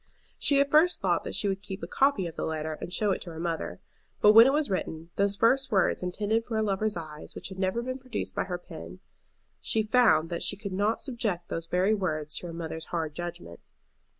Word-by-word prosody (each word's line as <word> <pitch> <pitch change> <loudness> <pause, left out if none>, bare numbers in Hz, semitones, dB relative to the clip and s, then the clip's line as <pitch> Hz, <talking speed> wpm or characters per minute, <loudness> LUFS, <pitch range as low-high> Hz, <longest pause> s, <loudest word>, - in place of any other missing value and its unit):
She 280 -1 +4
at 280 0 +2
first 325 +4 +5
thought - - +1
that - - -3
she 205 - +1
would 195 0 -1
keep 195 -1 -7
a - - -3
copy 270 -9 +2
of 165 - -6
the - - -4
letter 155 0 -2
and - - -6
show 205 +2 +1
it - - -1
to 175 - -6
her 160 -1 -8
mother. 165 -1 -3 0.4
But 210 - +7
when 225 +3 +10
it - - +4
was 300 +1 +1
written, 170 -4 -4
those 200 0 +3
first 250 +5 +3
words 190 -4 +2
intended 205 +5 -1
for 225 -1 -3
a 220 - +2
lover's 210 0 0
eyes 155 -2 -8
which - - -6
had 190 0 -4
ever 190 +6 0
been 255 +1 -4
produced 255 -3 -4
by - - -1
her 180 -2 -3
pen, 85 - -10 0.6
she 220 - 0
found 215 -8 +4
that 170 - -2
she 205 - 0
could 200 -1 -6
not 205 +4 0
subject 215 -10 -2
those 165 0 -4
very 185 +5 +2
words 155 -7 -2
to 175 - -5
her - - -6
mother's 160 -1 -5
hard 160 -3 -3
judgment. 175 - -7
195 Hz, 230 wpm, -28 LUFS, 170-225 Hz, 0.6 s, when